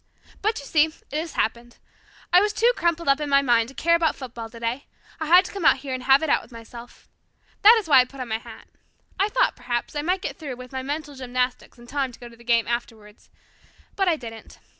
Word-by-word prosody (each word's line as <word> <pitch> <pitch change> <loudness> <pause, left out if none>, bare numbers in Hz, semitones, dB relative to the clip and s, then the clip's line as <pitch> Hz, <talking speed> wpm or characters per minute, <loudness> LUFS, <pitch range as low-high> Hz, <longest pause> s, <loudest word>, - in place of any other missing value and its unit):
But 430 +2 0
you 280 - -10
see 305 +1 +4
it 315 - -12
has 315 +1 -3
happened. 235 +2 -2 0.6
I 360 - +8
was 415 +1 +1
too 470 +3 +3
crumpled 340 -1 -1
up 275 +1 +4
in 295 - -3
my 280 0 +4
mind 235 -3 +2
to 270 - -14
care 335 +1 +2
about 335 -2 +2
football 240 -4 -8
today. 235 +4 -4 0.3
I 315 - -3
had 360 +3 +7
to - - -7
come 395 -3 -6
here 265 0 -6
and 255 - -4
have 270 +3 +5
it - - 0
out - - +3
with - - -18
myself. 235 +1 -12 0.5
That 445 +3 +8
is 420 - -7
why 275 -4 +7
I 250 - +5
put 270 +2 -14
on 250 -2 -5
my 220 0 -1
hat. - - -13 0.5
I 400 +2 +2
thought, - - +1
perhaps, 240 +3 -4
I 295 - -1
might 365 +5 -1
get - - -4
through 285 -5 -6
with 250 0 -11
my 260 -1 -4
mental 290 +2 -5
gymnastics 250 -1 -3
in 240 - -15
time 270 0 -2
to - - -15
go 240 0 -10
to 235 - -16
the 235 - -18
game 235 -1 +2
afterwards. 225 -3 -6 0.7
But 390 -1 +1
I 345 - +3
didn't. 225 -6 -10
270 Hz, 245 wpm, -24 LUFS, 240-320 Hz, 0.7 s, I